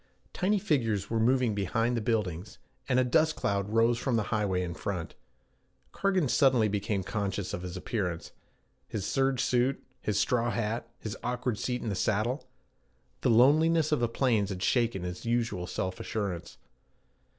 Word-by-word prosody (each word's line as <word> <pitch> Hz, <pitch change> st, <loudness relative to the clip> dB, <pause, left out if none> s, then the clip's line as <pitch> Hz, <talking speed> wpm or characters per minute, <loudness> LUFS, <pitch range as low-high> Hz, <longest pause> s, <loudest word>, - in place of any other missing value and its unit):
Tiny 200 Hz, +3 st, +1 dB
figures 115 Hz, -, 0 dB
were 115 Hz, -, +1 dB
moving 125 Hz, 0 st, +3 dB
behind 115 Hz, +5 st, 0 dB
the 115 Hz, -, -1 dB
buildings, 105 Hz, -5 st, -2 dB, 0.3 s
and 130 Hz, -1 st, +3 dB
a -, -, +4 dB
dust 155 Hz, +6 st, +2 dB
cloud 100 Hz, 0 st, -1 dB
rose 115 Hz, +2 st, +3 dB
from 130 Hz, -2 st, 0 dB
the 110 Hz, -, +2 dB
highway 100 Hz, -4 st, +1 dB
in 85 Hz, -1 st, -4 dB
front. 90 Hz, -2 st, -4 dB, 0.8 s
Cargan 190 Hz, -6 st, +1 dB
suddenly 125 Hz, -4 st, +4 dB
became 100 Hz, -1 st, -1 dB
conscious 100 Hz, -1 st, -3 dB
of -, -, -3 dB
his 90 Hz, 0 st, -6 dB
appearance 90 Hz, -4 st, -3 dB, 0.6 s
his 105 Hz, -5 st, -4 dB
serge 135 Hz, -1 st, +1 dB
suit, 125 Hz, +2 st, +1 dB, 0.2 s
his 105 Hz, -2 st, -1 dB
straw 120 Hz, -1 st, +1 dB
hat, 115 Hz, 0 st, -2 dB
his 110 Hz, -, -6 dB
awkward 125 Hz, -2 st, -2 dB
seat 125 Hz, -1 st, -2 dB
in 115 Hz, -, -2 dB
the -, -, -1 dB
saddle. 110 Hz, +8 st, 0 dB, 0.7 s
The -, -, +2 dB
loneliness 155 Hz, +7 st, +5 dB
of 150 Hz, -, +3 dB
the 120 Hz, -1 st, +1 dB
plains 115 Hz, -5 st, +1 dB
had 95 Hz, -2 st, -4 dB
shaken 115 Hz, -7 st, +1 dB
his 90 Hz, 0 st, -5 dB
usual 115 Hz, -6 st, -1 dB
self 95 Hz, +1 st, -3 dB
assurance. 100 Hz, -6 st, -4 dB
115 Hz, 160 wpm, -29 LUFS, 100-125 Hz, 0.8 s, loneliness